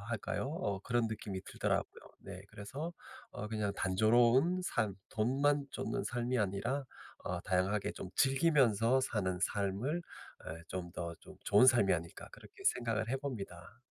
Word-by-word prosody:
할까요? 110 +1 -3 0.2
어 100 - -1
그런 120 +2 +1
느낌이 105 -3 -4
들더라고요. - - -1 0.2
네 - - -9
그래서 140 +12 -6 0.4
어 105 - -6
그냥 105 -2 -1
'단조로운 120 - +4
삶, 105 - -1
돈만 140 +6 +2
쫓는 - - -2
삶이 120 +3 -1
아니라 105 +7 0 0.4
어 90 -1 -2
다양하게 95 +2 0
좀 90 - -7
즐기면서 130 -4 +4
사는 95 -8 -1
삶을 105 - 0 0.5
예 80 - -10
좀 90 -1 -4
더 85 -1 -4
좀 - - -13
좋은 105 +5 +6
삶이 120 -7 +6
아닐까.' 85 -1 -4
그렇게 - - -14
생각을 115 -2 +1
해 130 - +1
봅니다. 110 -6 -7
110 Hz, 300 characters per minute, -34 LUFS, 100-130 Hz, 0.5 s, 좋은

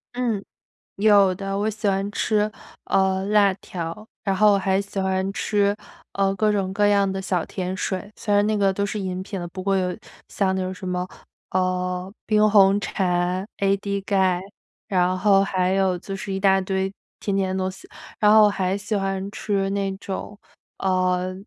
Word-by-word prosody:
嗯， 230 -5 -1 0.5
有 200 -2 +5
的。 195 0 -3
我 210 +2 0
喜 215 0 -4
欢 195 +1 0
吃， 215 0 +1 0.4
呃， 190 0 +2
辣 205 -2 +4
条， 180 +3 -7 0.2
然 195 -1 +1
后 210 +1 +5
我 - - +2
还 190 0 +1
喜 200 0 -7
欢 190 0 0
吃， 205 -1 +1 0.4
呃， 195 0 +1
各 215 +2 +2
种 195 -2 -1
各 205 +1 +3
样 200 -1 +3
的 190 0 -3
小 180 -3 -1
甜 185 0 -4
水， 190 +3 -3
虽 205 -2 -1
然 205 0 +4
那 215 0 +1
个 195 -1 +3
都 200 +1 -1
是 210 +1 -3
饮 185 -1 -3
品 195 0 -6
的， 175 - -4
不 185 +2 -7
过 195 0 +1
有 180 -1 -1 0.3
像 190 -2 0
那 190 - -1
种 185 0 -3
什 185 - -10
么， 180 0 -2 0.4
呃， 180 0 -1
冰 215 -1 +4
红 200 -1 +5
茶、 180 0 -1
AD 200 0 0
钙， 190 -3 +2 0.5
然 185 -2 +2
后 195 0 +4
还 185 -1 0
有 190 -2 +2
就 195 +2 -6
是 195 0 -5
一 190 - -2
大 195 -1 +4
堆 190 0 -2 0.3
甜 200 -1 -1
甜 190 -1 0
的 190 - -1
东 185 - -1
西。 190 - -14 0.3
然 210 0 +5
后 215 0 +8
我 210 - +7
还 190 0 -1
喜 205 +1 -3
欢 195 0 -2
吃 195 -2 -1
那 195 -1 -1
种， 200 +1 -6 0.4
呃， 185 -1 +1
195 Hz, 205 characters per minute, -23 LUFS, 185-200 Hz, 0.5 s, 后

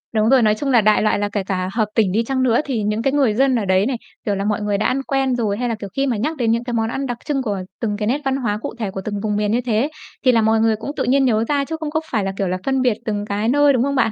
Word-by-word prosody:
Đúng 215 +1 +3
rồi, 265 -1 +5
nói 215 -2 +3
chung 275 +6 -3
là 235 -3 +5
đại 215 0 +3
loại 215 -1 +2
là 205 0 -1
kể 205 -1 -2
cả 185 -1 -2
hợp 220 -2 +2
tỉnh 215 -5 +3
đi 220 +5 +1
chăng 260 +2 -1
nữa 240 -2 +3
thì 245 -7 -2
những 210 +2 -1
cái 270 +3 0
người 270 -7 +3
dân 265 +3 +2
ở 225 -4 0
đấy 190 +1 +3
này, 260 -1 -1 0.3
kiểu 205 -2 0
là, 195 +1 -2
mọi 210 0 0
người 205 -1 0
đã 215 - -1
ăn 270 - +1
quen 270 -2 0
rồi, 210 -4 -1
hay 245 +1 -1
là, 230 - -1
kiểu, 205 -2 -8
khi 275 0 +1
mà 240 -5 0
nhắc 305 +9 -2
đến 235 -4 +1
những 235 +1 0
cái 245 - -4
món 225 -1 0
ăn 270 +3 -3
đặc 245 -2 -3
trưng 280 -2 0
của 205 -5 -2 0.2
từng 210 -3 -1
cái 210 0 -2
nét 275 +6 0
văn 270 0 +1
hóa 220 -6 -1
cụ - - -5
thể 210 -4 -2
của 190 - -5
từng 205 -1 -3
vùng 210 -1 0
miền 210 0 0
như 240 +3 +1
thế, 240 +3 0 0.4
thì 255 - +7
là 230 - +3
mọi 220 0 +3
người 225 0 +3
cũng 225 +6 -6
tự - - 0
nhiên 270 +2 +3
nhớ 225 -3 +2
ra 285 -1 +1
chứ 320 - -4
không 310 - -3
có 315 +1 0
phải 215 -5 0
là, 195 - -1
kiểu 195 - 0
là, 180 +1 -1
phân 265 -1 +1
biệt 245 -5 +2
từng 205 -2 -2
cái 210 +1 -2
nơi, 290 +1 +4
đúng 250 - +2
không 280 +1 -1
bạn? 240 -4 +2
225 Hz, 350 wpm, -20 LUFS, 210-265 Hz, 0.4 s, thì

